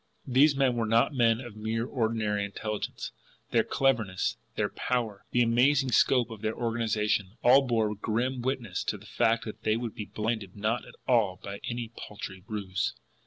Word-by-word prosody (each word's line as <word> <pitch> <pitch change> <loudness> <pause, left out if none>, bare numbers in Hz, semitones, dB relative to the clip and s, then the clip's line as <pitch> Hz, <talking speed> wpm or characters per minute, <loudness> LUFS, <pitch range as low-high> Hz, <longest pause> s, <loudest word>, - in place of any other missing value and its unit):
These 140 +3 +5
men 135 -3 +2
were 115 -2 0
not 115 +6 +3
men 115 -3 +3
of 120 -4 -8
mere 110 +2 -2
ordinary 110 -5 0
intelligence; 105 +1 -4 0.4
their - - +4
cleverness, 110 -9 +1 0.2
their - - 0
power, 115 -5 -2
the 120 - +3
amazing 130 +3 +3
scope 125 -1 +4
of 110 -2 -8
their 110 0 -1
organisation, 110 -3 0
all 130 +3 +7
bore 110 -3 +1
grim 120 +5 -1
witness 120 -7 -2
to - - -1
the - - -16
fact 115 0 +1
that 110 0 -7
they 110 0 +1
would 115 -2 -4
be 105 - -5
blinded 110 -3 -3
not 110 +4 -1
at - - -13
all 105 -8 +3
by 100 0 -6
any 120 -1 -4
paltry 95 -2 -8
ruse. 100 -4 -2
115 Hz, 170 wpm, -29 LUFS, 105-120 Hz, 0.4 s, all